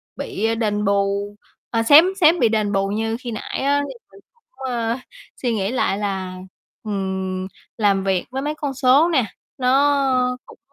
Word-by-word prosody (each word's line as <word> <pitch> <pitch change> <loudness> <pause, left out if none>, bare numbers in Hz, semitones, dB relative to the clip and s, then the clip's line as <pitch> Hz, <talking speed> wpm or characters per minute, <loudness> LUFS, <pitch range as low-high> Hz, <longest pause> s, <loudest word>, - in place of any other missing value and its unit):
bị 225 +2 -2
đền 210 -2 -1
bù 200 +1 0 0.4
à, 230 -1 +1
xém 290 +8 +8 0.2
xém 330 +2 +5
bị 235 - +4
đền 215 -2 0
bù 195 0 +1
như 225 +2 -2
khi 245 -3 -6
nãy 220 - -5
á, 285 +1 +2
thì - - -7 0.2
mình - - -16
cũng, 470 -1 -37 0.3
ờ, 230 0 -1 0.4
suy 240 -3 0
nghĩ 200 +1 -1
lại 255 -6 0
là, 190 -3 -3 0.5
ừm, 190 -2 -3 0.3
làm 200 -3 +2
việc 190 -2 0
với 265 - -3
mấy 295 +2 -2
con 285 -3 -3
số 270 +5 +4
nè, 265 -9 +2 0.3
nó 260 -1 +2
cũng, - - -16
225 Hz, 175 wpm, -21 LUFS, 200-270 Hz, 0.5 s, xém